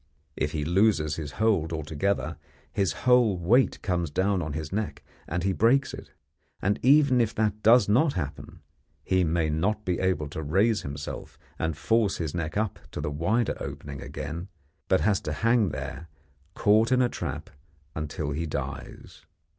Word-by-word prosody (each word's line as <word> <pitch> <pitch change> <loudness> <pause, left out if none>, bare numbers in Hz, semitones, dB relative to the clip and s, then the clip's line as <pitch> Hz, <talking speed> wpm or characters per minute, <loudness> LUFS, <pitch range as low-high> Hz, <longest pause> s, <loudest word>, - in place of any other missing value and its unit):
If 75 - -2
he 75 -2 -2
loses 85 -4 +2
his 75 -3 -5
hold 100 -8 +1
altogether, 80 +2 -2 0.4
his 95 -6 +1
whole 125 -6 +5
weight 115 +10 +3
comes 85 -4 0
on 95 -5 +1
his 80 +1 -5
neck, 105 0 -3 0.2
and 90 +2 -2
he 95 0 +1
breaks 130 +6 +3
it; - - -9 0.5
and 100 +2 0
even 135 -1 +5
if 115 -2 0
that 105 -1 0
does 115 -1 +6
not 135 +8 +3
happen, 75 -4 -6 0.4
he 95 -1 +2
may 80 -1 +1
not 105 +7 -1
be 90 -2 0
able 90 -5 0
to 80 - -5
raise 100 +9 +2
himself 70 +1 -7 0.2
and 80 -2 -1
force 110 +5 +1
his 80 -4 -3
neck 85 +1 -3
up 110 -1 -1
to - - -4
the 75 0 -2
wider 100 +10 0
opening 70 -2 -7
again, 80 +6 -6 0.4
but 95 - +3
has 100 -2 +2
to 75 - -3
hang 115 +2 +2
there 85 +2 -6 0.5
caught 110 +3 +3
in 130 0 +4
a - - +3
trap - - -5 0.4
until 75 -1 -4
he 80 +4 -2
dies. 70 -2 -7
90 Hz, 165 wpm, -27 LUFS, 80-110 Hz, 0.5 s, does